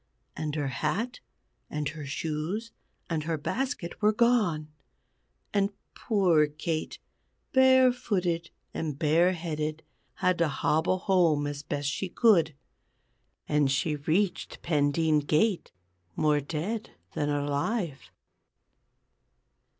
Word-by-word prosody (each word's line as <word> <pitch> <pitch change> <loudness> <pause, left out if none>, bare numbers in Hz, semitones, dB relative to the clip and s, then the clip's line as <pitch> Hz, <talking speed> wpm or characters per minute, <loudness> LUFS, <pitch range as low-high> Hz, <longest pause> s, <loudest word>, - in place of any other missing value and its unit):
And 150 -1 -3
her 145 -3 -1
hat, 170 - -2 0.5
and 150 -1 -2
her 150 -2 -7
shoes, 160 +10 -3 0.4
and 160 -3 -2
her 165 -1 -1
basket 230 - -3
were 210 0 +5
gone; 215 -9 +2 0.9
and 200 -1 +2 0.2
poor 180 -8 +3
Kate, 155 +2 -3 0.6
barefooted 245 -10 +3 0.2
and 150 -4 -3
bareheaded, 160 -1 +1 0.3
had 180 -1 +1
to 170 - +3
hobble 155 +5 +1
home 175 -6 +2
as 145 0 -4
best 145 -1 -3
she 180 +5 -2
could. 175 - +4 0.9
And 150 -2 +2
she 150 +3 +1
reached 170 +7 -1
Pendeen 155 0 +2
gate 160 +7 +1 0.5
more 150 -1 +3
dead 170 +10 -4 0.2
than 145 -1 -1
alive. 145 - -2
160 Hz, 105 wpm, -28 LUFS, 150-195 Hz, 0.9 s, were